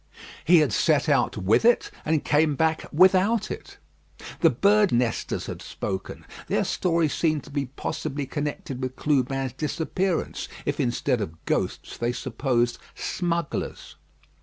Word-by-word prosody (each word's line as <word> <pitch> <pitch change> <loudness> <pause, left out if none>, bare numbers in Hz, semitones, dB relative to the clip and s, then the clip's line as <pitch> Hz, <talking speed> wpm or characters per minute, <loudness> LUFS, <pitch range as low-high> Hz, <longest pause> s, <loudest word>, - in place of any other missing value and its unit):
"He 175 +1 +7
had 150 - +1
set 155 -1 +2
out 135 -6 +2
with 100 - +3
it, 240 +1 +3
and 155 -1 0
come 150 0 +3
back 160 +1 0
without 190 +6 +4
it." - - -8 0.6
The - - +6
birds' 205 -1 +3
nesters 120 -1 0
had - - -6
spoken: 95 -1 -5 0.2
their - - +1
story 170 -2 +1
seemed 155 -1 0
to 145 - -13
be 140 -2 -2
possibly 145 +1 -4
connected 145 -2 -4
with 130 0 -3
Clubin's 135 -3 0
disappearance, 160 +5 -2 0.2
if 145 +1 -2
instead 125 -1 0
of 85 -5 -7
ghosts - - -2
they 120 +1 -1
supposed 120 -1 -1 0.2
smugglers. 170 -3 -3
145 Hz, 135 wpm, -25 LUFS, 130-165 Hz, 0.6 s, He